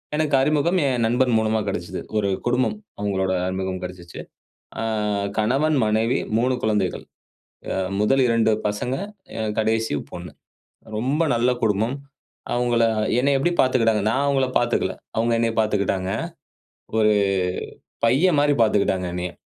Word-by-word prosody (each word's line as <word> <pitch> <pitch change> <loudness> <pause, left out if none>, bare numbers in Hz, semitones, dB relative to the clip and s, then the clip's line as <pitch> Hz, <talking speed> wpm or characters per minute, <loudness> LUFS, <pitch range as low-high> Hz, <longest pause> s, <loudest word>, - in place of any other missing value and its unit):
எனக்கு 150 -2 +1
அறிமுகம் 155 +6 +2
என் 125 -3 0
நண்பன் 125 +2 +2
மூலமா 110 0 +1
கெடைச்சது. 90 -1 -4 0.2
ஒரு 100 -2 +1 0.2
குடும்பம் 125 - +1 0.2
அவங்களுடைய 95 -2 -1
அறிமுகம் 95 0 -3
கெடைச்சுச்சு. 90 -1 -8 0.6
ஆ - - -2 0.6
கணவன், 135 +8 +2
மனைவி, 110 +3 +1 0.2
3 125 +2 +1
குழந்தைகள். 105 -4 0 1.0
முதல் 135 +6 +3
2 115 -1 +3 0.2
பசங்க, 105 +5 -2 0.6
கடைசி 110 -1 0 0.2
பொண்ணு. 90 0 -8 0.7
ரொம்ப 135 +8 0
நல்ல 120 +2 +2
குடும்பம். 110 +4 +1 0.6
அவங்களை 120 -1 +2 0.3
என்னை 140 +3 +2
எப்படி 140 +6 +1
பாத்துக்கிட்டாங்கன்னா, 115 -5 +2
நான் 130 +5 +1
அவங்கள 135 -2 +2
பார்த்துக்கல. 120 -6 0 0.2
அவங்க 115 +1 +1
என்ன 115 0 +1
பார்த்துக்கிட்டாங்க. 100 -3 0 0.9
ஒரு 110 -1 +4 0.9
பையன் 150 +7 +3
மாரி 145 0 +3
பார்த்துக்கிட்டாங்க 100 -4 +1
என்னைய. 90 0 -3
115 Hz, 120 wpm, -23 LUFS, 100-130 Hz, 1.0 s, ஒரு